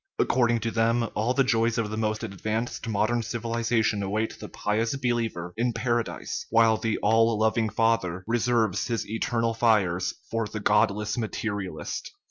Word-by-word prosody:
According 120 -2 +2
to 115 +1 -1
them, 115 +1 +2
all 115 +4 0
the 135 - +4
joys 115 -1 +1
of 110 -2 -1
the - - -2
most 110 0 -1
advanced 110 +3 -3
modern 110 +2 +1
civ 115 +1 -5
ilization 115 -2 +1
await 105 +3 -2
the - - -8
pious 110 +4 -1
believer 115 -9 -2
in 120 +1 +1
Paradise, 120 0 -2
while 115 -1 +4
the 110 0 -1
"All 115 +1 +4
loving 110 +1 +2
Father 110 -5 +1
" - - -47
reserves 115 -4 +1
his 115 -2 -2
eternal 115 +1 0
fires 105 -6 +2 0.2
for 115 -1 -1
the 110 +1 -5
godless 105 +2 +1
materialist. 100 -7 -4
115 Hz, 160 wpm, -26 LUFS, 105-115 Hz, 0.2 s, the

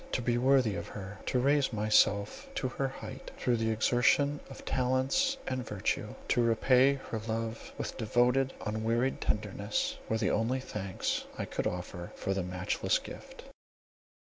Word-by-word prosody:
To 130 - +1
be 120 0 +2
worthy 130 -4 +4
of - - -4
her, 100 0 -8
to - - +1
raise 140 +2 +3
myself 105 -1 +2
to 130 - -1
her 135 +2 -1
height 110 -5 -8
through 120 -2 +1
the 110 0 0
exertion 125 +6 +3
of 135 - -10
talents 130 - +1
and 130 -1 -1
virtue, 105 -4 -2
to 120 - +3
repay 125 +4 +4
her 125 -4 -5
love 115 0 -3
with - - -4
devoted, 125 +4 +2
unwearied 115 +4 0
tenderness, 105 0 -1
were 110 - +2
the - - +1
only 115 +5 +1
thanks 100 -7 -3
I - - -2
could - - -2
offer 90 0 -5
for 95 - -1
the 95 - -1
matchless 90 +1 0
gift. - - -10
115 Hz, 155 wpm, -31 LUFS, 105-130 Hz, -, worthy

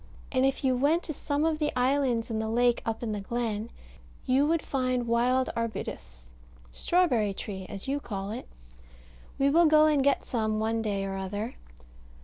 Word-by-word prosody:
And 260 0 +3
if 270 - -2
you 260 -1 +3
went 295 +7 +2
to 310 - -4
some 290 +1 -1
of 320 -1 0
the 300 -1 0
islands 250 -3 +1
in 220 - -1
the 220 0 -2
lake 240 +1 +2
up 225 +1 -2
in 225 - -2
the 210 - -2
glen, 225 +1 -3 0.6
you 270 +2 +3
would 330 0 +1
find 255 -2 -1
wild 245 +2 +2
arbutus - - -5 0.4
strawberry 245 - +1
tree, 190 -2 -6
as 200 +4 -7
you 280 +2 0
call 200 -6 -5
it. 240 +4 -6 0.9
We 275 +1 +3
will 335 +2 +5
go 310 0 +6
and 300 -3 +3
get 280 0 +2
some 220 -3 -1
one 225 +1 0
day 200 -3 -1
or 195 0 -4
other. 205 +5 -4
245 Hz, 180 wpm, -28 LUFS, 215-280 Hz, 0.9 s, go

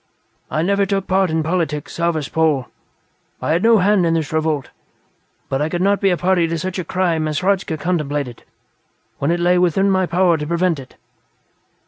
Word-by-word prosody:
I 155 - -1
never 200 +2 +1
took 195 -1 -1
part 190 -1 +2
in 160 0 0
politics, 160 -3 -2
Zarvas 170 -4 0
Pol; 155 -5 +1 0.7
I - - -2
had 165 +2 +2
no 230 +1 +5
hand 200 0 +3
in 165 -1 +2
this 160 -2 -2
revolt. 155 -3 -1 0.8
But 135 +1 -2
I 150 - 0
could 175 - -2
not 200 +1 +2
be 195 -3 +3
party 180 -1 +1
to 165 0 -2
such 185 +3 -4
a - - -2
crime 170 -3 0
as 155 +1 -2
Hradzka 190 -4 0
contemplated 145 -7 -2 0.8
when 140 - 0
it 175 +1 +1
lay 175 +1 +3
within 185 +3 +2
my 190 -1 +1
power 175 -1 +2
to 150 -1 -5
prevent 170 -1 0
it." 130 - -12
170 Hz, 185 wpm, -19 LUFS, 155-185 Hz, 0.8 s, no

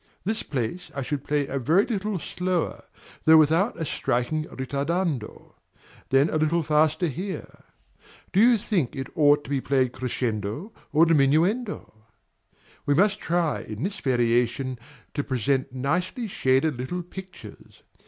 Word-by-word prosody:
This 220 +4 -1
place 150 +7 -4
I 140 - -2
should 140 +1 -3
play 145 -1 0
a 135 0 -3
very 165 - +3
little 210 -3 -2
slower, 180 0 -2 0.4
though 160 0 +8
without 165 +6 +3
a 160 - -1
striking 140 +4 -1
ritardando; 140 - -3 0.6
then 135 +3 +4
a - - +1
little 160 +2 +1
faster 155 +2 +2
here; 185 +5 -5 0.7
do 190 - +3
you 235 +2 +6
think 190 - -1
it 135 -1 -5
ought 145 -1 +4
to - - -12
be 135 -2 0
played 130 -2 +1
crescendo 125 - -3 0.2
or 160 +2 +5
diminuendo? 165 - +2 0.9
We 145 - +3
must 205 +5 +3
try 170 -2 0
in 110 +4 -6
this 195 +2 -3
variation 125 0 +1 0.3
to 145 - -1
present 130 +1 0
nicely 180 - -1
shaded 135 - +1
little 175 +8 -3
pictures. 180 - -12
150 Hz, 140 wpm, -25 LUFS, 130-180 Hz, 0.9 s, though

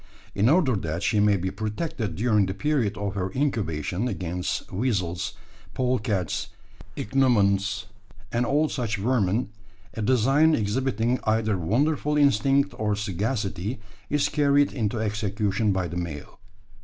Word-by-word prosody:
In 105 +4 +3
order 150 -6 +3
that 85 0 -3
she 105 - +2
may 105 -1 +4
be 95 +1 -2
protected 110 - -3
during 105 -1 +2
the 95 - -3
period 120 -4 0
of 100 -1 -3
her 95 -2 -2
incubation 105 - -1
against 90 -4 -3
weasels, 90 -6 -1 0.4
polecats, 110 -5 -1 0.5
ichneumons, 105 -7 +2 0.5
and 120 +1 +1
all 145 +5 +2
such 120 -8 -2
vermin, 110 0 +1 0.4
a 110 - -5
design 135 +7 +4
exhibiting 120 +2 0
either 110 -1 +1
wonderful 145 - +1
instinct 140 +1 +3
or 105 -1 +1
sagacity, 105 +1 -2 0.3
is 145 -1 +2
carried 145 -1 +3
into 110 -2 -1
execution 105 -1 0
by 95 -2 0
the 85 +1 -5
male. 85 -3 -6
110 Hz, 130 wpm, -25 LUFS, 100-130 Hz, 0.5 s, may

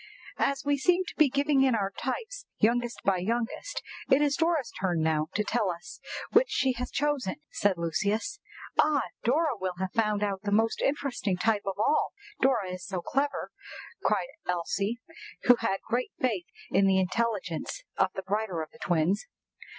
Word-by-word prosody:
"AS 275 0 +1
we 285 0 +2
seem 360 +5 +3
to - - -8
be 305 -3 +5
giving 280 +1 +2
in 260 -3 +4
our 200 -2 0
types 460 - -4
youngest 240 +2 +2
by 195 -1 +4
youngest, 230 - -2 0.3
it 265 - +6
is 290 -1 +3
Dora's 325 -7 +1
turn 175 -4 +1
now 155 -1 +1
to 210 - +2
tell 215 -2 +1
us 180 - -6 0.3
which 475 +2 +5
she 265 - +2
has 250 +1 -4
chosen," 290 -8 0 0.2
said 200 -3 +1
Lucius. 200 - -1 0.4
"Ah! 295 -4 +4 0.2
Dora 290 +3 +2
will 185 -3 -3
have 190 0 -2
found 210 -2 +1
out 195 -2 -1
the 205 - -2
most 225 +2 +2
interesting 260 -9 0
type 205 +1 +1
of 195 - -1
all, 220 +8 +2 0.3
Dora 245 -8 +3
is 180 0 -6
so 190 -1 -3
clever!" 280 +1 -1 0.5
cried - - +1 0.2
Elsie, 195 +6 -1 0.4
who 245 -1 +7
had 195 -4 -1
great 245 +2 -1
faith 215 -9 0 0.2
in 195 +1 +4
the 190 0 +4
intelligence 190 -3 -1
of 190 - +3
the 190 - -4
brighter 195 -4 -1
of 155 - -11
the - - -18
twins. 175 - +1
220 Hz, 175 wpm, -29 LUFS, 190-275 Hz, 0.5 s, who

